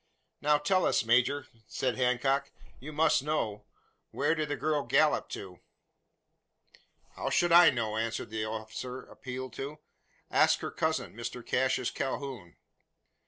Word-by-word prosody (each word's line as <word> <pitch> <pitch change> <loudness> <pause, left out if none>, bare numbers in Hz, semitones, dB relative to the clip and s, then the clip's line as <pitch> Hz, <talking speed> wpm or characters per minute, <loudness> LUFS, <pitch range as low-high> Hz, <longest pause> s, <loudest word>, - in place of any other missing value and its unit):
"Now 150 0 +4
tell 185 +5 +2
us, - - +2
major!" 125 +4 +3 0.2
said 130 -1 -1
Hancock: 135 +2 +1 0.3
"you 150 +5 -8
must 155 -2 +3
know. 110 -9 -2 0.4
Where - - +1
did 155 -2 -2
the 145 - 0
girl 150 +3 0
gallop 150 +2 +2
to?" 90 -2 -8 1.5
"How - - -4
should 175 -1 +2
I 170 0 +9
know?" 110 -4 -2
answered 115 -1 -3
the 110 -1 -2
officer 110 +4 -6
appealed 130 -1 -7
to. 145 +3 -5 0.5
"Ask - - +4
her - - -4
cousin, - - -1
Mr 115 +2 -6
Cassius 130 -1 +1
Calhoun." 130 -9 -4
130 Hz, 135 wpm, -30 LUFS, 115-150 Hz, 1.5 s, I